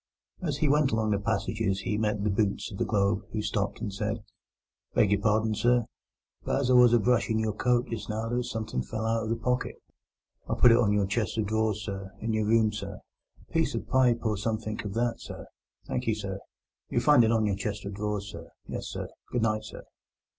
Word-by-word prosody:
As 150 -6 -1
he 150 - +1
went 145 -1 +3
along 110 -1 +1
the 100 - +2
passages 100 0 -1
he 105 - -1
met 105 -1 0
the 105 - +1
boots 100 +1 0
of 95 - -8
the - - +1
Globe, 100 -1 +1
who 110 - -1
stopped 105 0 -2
and 105 -4 -3
said: 105 +2 -2 0.8
"Beg 100 - +4
your 100 -1 +2
pardon, 110 +1 +2
sir, 120 +2 +2 0.6
but - - 0
as 130 -2 +1
I - - +5
was 125 -1 +7
a 120 - +6
brushing 115 -1 +2
your 110 -1 0
coat 125 +3 +2
just 115 -1 -5
now 110 +1 -2
there 120 +1 -1
was 125 - -2
somethink 110 - -3
fell 110 +10 -3
out 115 0 +1
of 110 - -3
the 115 - +1
pocket. 125 +2 -1 0.7
I - - +1
put 120 - +7
it 115 - +6
on 115 -4 +3
your 105 -1 +2
chest 105 +2 -1
of 110 - +1
drawers, 110 0 0
sir, 95 -2 -6
in 115 0 -2
your 110 -1 +1
room, 110 -1 +3
sir—a 105 - -10
piece 160 -5 +1
of 115 - -2
a - - -22
pipe 125 -3 +4
or 105 -2 +1
somethink 110 0 -3
of 100 - -5
that, 120 0 0
sir. - - -8 0.4
Thank - - -3
you, 110 - +2
sir. 100 -2 -5 0.5
You'll - - +1
find 145 -5 +6
it 110 - +3
on 110 -2 +2
your 100 -2 +1
chest 100 +1 -4
of 100 - -4
drawers, 105 0 -3
sir—yes, 85 0 -8
sir. - - -5 0.2
Good 120 -2 0
night, 110 -1 0
sir." - - -9
110 Hz, 225 wpm, -28 LUFS, 105-115 Hz, 0.8 s, was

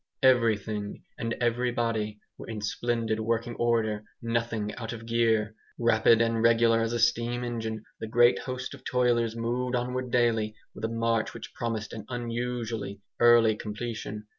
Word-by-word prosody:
Everything 110 -5 +2 0.2
and 115 0 -2
everybody 115 -3 0 0.2
were - - -10
in 110 -2 -4
splendid 115 +1 -1
working 115 +2 -1
order, 110 -3 +1 0.2
nothing 115 -2 -1
out 115 0 -5
of 115 -1 -8
gear. 115 -2 +2 0.2
Rapid 115 -1 +4
and 115 -1 0
regular 115 0 +4
as 115 0 0
a 120 - 0
steam 120 +1 +1
engine 110 -2 -3 0.2
the 110 - -4
great 120 +2 +5
host 130 0 -5
of 135 -2 -12
toilers 120 -3 +1
moved 125 +2 -1
onward 125 +1 -2
daily 115 -3 +2 0.2
with 110 - -4
a - - -1
march 115 0 0
which 115 - -9
promised 110 -3 -3
an 110 - -7
unusually 120 -4 -3 0.2
early 120 -2 +6
completion. 105 0 -5
115 Hz, 150 wpm, -28 LUFS, 110-120 Hz, 0.2 s, early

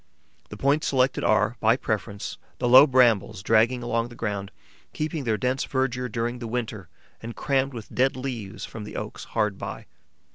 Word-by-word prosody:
The 105 - -8
points 140 +6 +2
selected 130 0 +1
are, 110 +2 +2
by 115 +2 +4
preference, 100 -4 -4 0.2
the 125 - -1
low 130 +4 +9
brambles 115 -6 +3
dragging 115 +3 +3
along 115 0 0
the 120 - -12
ground, 100 -4 -3 0.4
keeping 155 -2 -3
their 110 -2 +1
dense 125 +3 0
verdure 125 -2 -1
during 120 +2 -2
the 120 - -5
winter 110 -6 -4 0.3
and 115 +1 -7
crammed 135 -2 0
with 110 -2 -9
dead 130 +2 +2
leaves 125 -7 -5
from 110 - -8
the 105 - -9
oaks - - -6
hard 105 -2 -1
by. - - -6
120 Hz, 175 wpm, -25 LUFS, 110-130 Hz, 0.4 s, low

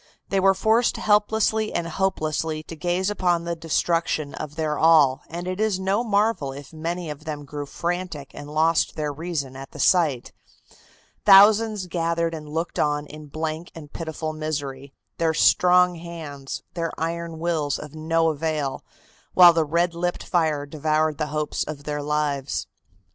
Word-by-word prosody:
They 195 - +1
were 195 0 +4
forced 220 +4 +2
helplessly 215 +1 +2
and 170 -1 -1
hopelessly 160 -3 -1
to 165 - -9
gaze 180 +5 -1
upon 175 -4 +1
the 170 0 -3
destruction 165 -2 -1
of 150 -1 -7
their 155 -2 -1
all, 155 -5 +5
and 175 +2 -5
it 185 +1 -3
is 215 -3 +1
no 195 +4 +1
marvel 210 - +1
if 140 +3 -11
many 165 +1 -4
of 150 +2 -10
them 150 -2 -5
grew 145 +1 -6
frantic 170 -4 -4
and 145 0 -9
lost 160 +2 +2
their 150 -1 -2
reason 150 -4 -4
at 135 0 -10
the - - -10
sight. 155 -9 +2 0.9
Thousands 210 +1 +6
gathered 170 -1 -1
and 155 -2 -7
looked 165 +3 -3
on 145 0 +1
in 150 0 -11
blank 155 +3 -4
and 150 -3 -11
pitiful 160 -1 -4
misery, 145 -3 -4 0.3
their 165 -1 +1
strong 180 +1 +5
hands, 160 -5 -7
their 165 -1 -2
iron 165 0 -3
wills 160 -4 -1
of 150 -1 -9
no 165 +1 +1
avail, 150 -2 -2 0.5
while 175 -2 +9
the 165 -1 +2
red 170 +3 +1
lipped 175 +1 -2
fire 155 -5 0
devoured 155 0 0
the 155 - 0
hopes 150 0 -2
of 150 -2 -7
their 150 0 -3
lives. 145 -2 -1
160 Hz, 160 wpm, -24 LUFS, 150-175 Hz, 0.9 s, while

